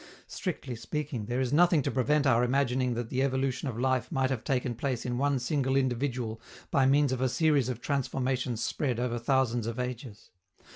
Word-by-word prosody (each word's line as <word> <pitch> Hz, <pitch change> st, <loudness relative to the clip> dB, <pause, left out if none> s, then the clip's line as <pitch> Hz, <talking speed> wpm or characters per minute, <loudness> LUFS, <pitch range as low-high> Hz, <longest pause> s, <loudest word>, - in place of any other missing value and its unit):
Strictly 145 Hz, -9 st, -4 dB
speaking, 140 Hz, -2 st, -4 dB
there 120 Hz, +2 st, -1 dB
is 130 Hz, 0 st, 0 dB
nothing 170 Hz, -2 st, +4 dB
to -, -, -1 dB
prevent 145 Hz, +3 st, +2 dB
our 120 Hz, -3 st, +4 dB
imagining 125 Hz, -1 st, +1 dB
that 115 Hz, -1 st, -4 dB
the 130 Hz, -, 0 dB
evolution 135 Hz, 0 st, 0 dB
of 120 Hz, -4 st, -4 dB
life 130 Hz, -1 st, 0 dB
might 135 Hz, -3 st, +1 dB
have 125 Hz, -4 st, -2 dB
taken 125 Hz, -2 st, 0 dB
place 125 Hz, +1 st, -3 dB
in 120 Hz, 0 st, -2 dB
one 140 Hz, 0 st, +2 dB
single 135 Hz, 0 st, 0 dB
individual 125 Hz, -3 st, -1 dB, 0.3 s
by 135 Hz, -1 st, +4 dB
means 140 Hz, 0 st, +4 dB
of 130 Hz, -1 st, -2 dB
a 130 Hz, -, +2 dB
series 145 Hz, -3 st, +2 dB
of 125 Hz, -2 st, -4 dB
transformations 130 Hz, -3 st, -1 dB
spread 130 Hz, -5 st, -1 dB
over 120 Hz, -1 st, -1 dB
thousands 120 Hz, -2 st, +1 dB
of 115 Hz, +1 st, -4 dB
ages. 125 Hz, -3 st, -6 dB
130 Hz, 190 wpm, -29 LUFS, 120-135 Hz, 0.3 s, nothing